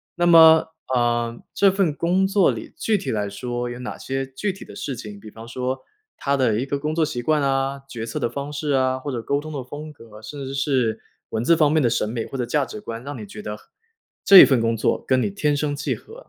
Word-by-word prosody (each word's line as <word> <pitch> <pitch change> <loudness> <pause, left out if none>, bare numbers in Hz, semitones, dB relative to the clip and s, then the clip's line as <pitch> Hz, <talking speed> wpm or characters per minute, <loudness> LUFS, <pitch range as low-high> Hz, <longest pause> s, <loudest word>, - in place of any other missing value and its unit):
那 175 - +1
么， 160 -1 +7 0.2
呃， 120 -1 0
这 195 -1 +4
份 185 -6 0
工 180 +6 +1
作 195 -2 +3
里， - - -8
具 220 -2 +1
体 195 - -4
来 105 -2 -1
说， 120 +4 -4
有 120 0 -7
哪 125 - -6
些 135 0 -3
具 135 +10 -3
体 190 - -11
的 - - -12
事 140 - -4
情， 105 -3 -9
比 110 - -11
方 115 +1 -11
说， 130 +1 -3 0.4
它 140 0 0
的 115 -4 +2
一 130 - -1
个 140 0 -2
工 150 +2 -3
作 160 -1 +2
习 120 -5 -4
惯 155 +2 +2
啊， 135 0 0
决 115 -4 -6
策 115 - -4
的 - - 0
方 140 +4 -5
式 145 0 -2
啊， 130 -1 +1
或 145 +1 -5
者 120 -2 -3
沟 140 +4 0
通 155 +1 -8
的 135 - -4
风 150 +4 -9
格， 110 -5 -14
甚 140 +5 -7
至 135 +1 -5
是， 130 -5 0 0.3
文 110 +1 -2
字 170 +5 +5
方 150 -2 +3
面 155 -1 +3
的 120 - +3
审 115 -2 0
美 115 -1 -3
或 135 - -7
者 125 - -1
价 145 0 +1
值 105 - -9
观， 115 +1 -7
让 145 +1 -6
你 110 - -7
觉 105 +2 -9
得， 105 0 -5 0.7
这 195 -1 +10
一 - - +11
份 130 -4 +2
工 115 0 +1
作 110 - 0
跟 130 -1 +3
你 - - 0
天 150 -8 0
生 145 0 -1
契 145 - -2
合？ 450 - -14
135 Hz, 275 characters per minute, -22 LUFS, 120-150 Hz, 0.7 s, 一